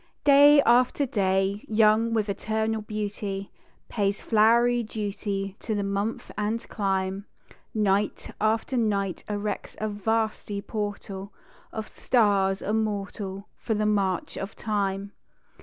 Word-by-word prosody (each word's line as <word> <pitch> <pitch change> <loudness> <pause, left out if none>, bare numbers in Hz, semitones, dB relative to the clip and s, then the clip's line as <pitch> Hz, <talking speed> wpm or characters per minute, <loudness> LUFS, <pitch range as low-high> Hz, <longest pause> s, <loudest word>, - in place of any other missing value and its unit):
Day 285 0 +7
after 250 +4 +4
Day, 195 -3 0
young 220 +1 +4
with 220 -2 +1
eternal 220 +2 -1
beauty, 205 -2 -4 0.4
Pays 200 -2 0
flowery 235 +2 +4
duty 200 -3 -3
to 220 - -3
the 205 - -1
month 200 +3 -2
and 215 +2 -2
clime; 195 0 -1 0.5
Night 205 -1 0
after 220 +4 +1
night 200 -5 0
erects 210 0 -3
a 215 - -1
vasty 215 0 -1
portal 200 -1 -5 0.4
Of 220 -1 -5
stars 200 -5 +2
immortal 200 -2 -2
for 220 - -2
the 215 0 0
march 195 -4 0
of 195 +2 -5
Time. 200 -2 -2
210 Hz, 115 wpm, -26 LUFS, 200-220 Hz, 0.5 s, Day